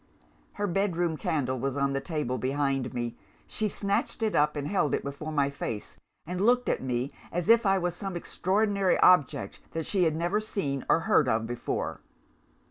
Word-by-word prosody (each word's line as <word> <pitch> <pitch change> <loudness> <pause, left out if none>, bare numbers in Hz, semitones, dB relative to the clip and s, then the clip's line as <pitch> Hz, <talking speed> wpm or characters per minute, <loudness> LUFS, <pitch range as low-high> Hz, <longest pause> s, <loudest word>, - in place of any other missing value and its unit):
"Her 205 - -2
bedroom 175 -3 0
candle 145 -7 -1
was 135 +2 -2
on 140 0 +1
the 135 - -1
table 150 -6 -2
behind 135 -1 0
me. 120 -1 -3 0.3
She 215 - -1
snatched 200 +2 -1
it 220 - +1
up 150 0 +3
and 145 -1 -3
held 185 -6 +1
it - - -4
before 140 +3 -5
my 140 -2 +1
face, 115 -6 -5 0.3
and 180 +2 -3
looked 245 +4 +3
at - - 0
me 125 +1 -2 0.2
as 175 +3 -2
if 230 -2 +6
I 195 0 +4
was 175 -2 -1
some 195 0 -5
extraordinary 200 +2 +1
object 140 - +4
that 160 -1 -2
she 190 -3 +2
had 160 -1 +1
never 175 +6 0
seen 145 -11 -3
or 165 - +4
heard 150 -4 +3
of 110 0 +1
before! 120 +1 -3
160 Hz, 185 wpm, -28 LUFS, 135-195 Hz, 0.3 s, if